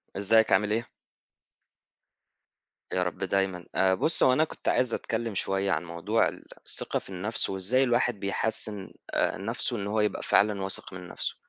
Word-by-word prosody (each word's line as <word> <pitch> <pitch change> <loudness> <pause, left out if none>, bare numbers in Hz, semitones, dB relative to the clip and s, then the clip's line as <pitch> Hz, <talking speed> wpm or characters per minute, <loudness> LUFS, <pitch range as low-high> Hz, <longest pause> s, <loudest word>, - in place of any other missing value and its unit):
إزيك 110 +3 +3
عامل 105 +2 +3
إيه؟ 115 +2 -2 2.1
يا 90 - +1
رب 90 0 -3
دايمًا، 95 -2 -1
آآ، 95 -1 +3
بُص 155 - +2
هو 130 - +5
أنا 155 +5 +3
كنت - - -8
عايز 125 -2 +2
أتكلم 115 -2 -3
شوية 95 +1 0
عن 85 -1 -1
موضوع 85 +7 0
ال - - -8 0.2
الثقة - - 0
في - - -14
النفس 100 +4 +1
وإزاي 95 +8 +2
الواحد 120 -3 +1
بيحسن 105 0 -2 0.2
آآ، - - +1
نفسه 115 +4 -1
إن 100 -1 -4
هو 110 +2 0
يبقى 105 - -1
فعلًا 105 -1 +2
واثق 95 0 -4
من 90 -1 -8
نفسه، - - -3
100 Hz, 165 wpm, -27 LUFS, 95-115 Hz, 2.1 s, هو